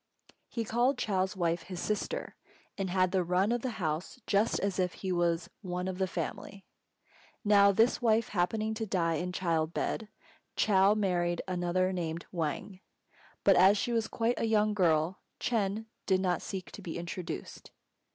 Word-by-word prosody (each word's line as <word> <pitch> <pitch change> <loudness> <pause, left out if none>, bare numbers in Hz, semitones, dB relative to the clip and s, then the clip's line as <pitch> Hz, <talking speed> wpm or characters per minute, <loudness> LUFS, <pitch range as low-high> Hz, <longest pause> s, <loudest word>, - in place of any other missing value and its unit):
He 230 - -2
called 240 +5 +1
Chou's 190 -3 0
wife 170 -1 +1
his 180 +1 -7
"sister," 215 - -3 0.4
and 195 -2 -2
had 185 0 +2
the 185 -1 +2
run 180 +5 +2
of 240 -1 0
the 255 - -2
house 165 +5 -3
just 205 +3 +2
as 195 -1 -1
if 180 -1 +1
he 190 - -4
was 170 -1 0
one 180 -1 -3
of 185 0 -4
the 190 - +1
family. 185 +3 -5 0.8
Now 200 -1 +6
this 225 +6 +3
wife 225 -1 +3
happening 215 +4 0
to 220 0 -4
die 165 -4 +1
in 180 +3 -3
child 165 -3 -1
bed, 220 - -2 0.5
Chou 200 0 +4
married 175 -4 0
another 185 +1 0
named 170 -2 -3
Wang; 170 +3 -3 0.6
but 195 - +6
as 190 +4 +6
she 240 - -1
was 225 -2 +1
quite 230 +1 0
a - - +1
young 215 -1 +3
girl, 170 -2 +2 0.2
Ch'êng 215 -2 0 0.2
did 190 -1 +3
not 180 -2 0
seek 190 -2 -6
to - - -9
be 170 -3 -5
introduced. 170 - -6
190 Hz, 170 wpm, -31 LUFS, 175-210 Hz, 0.8 s, Now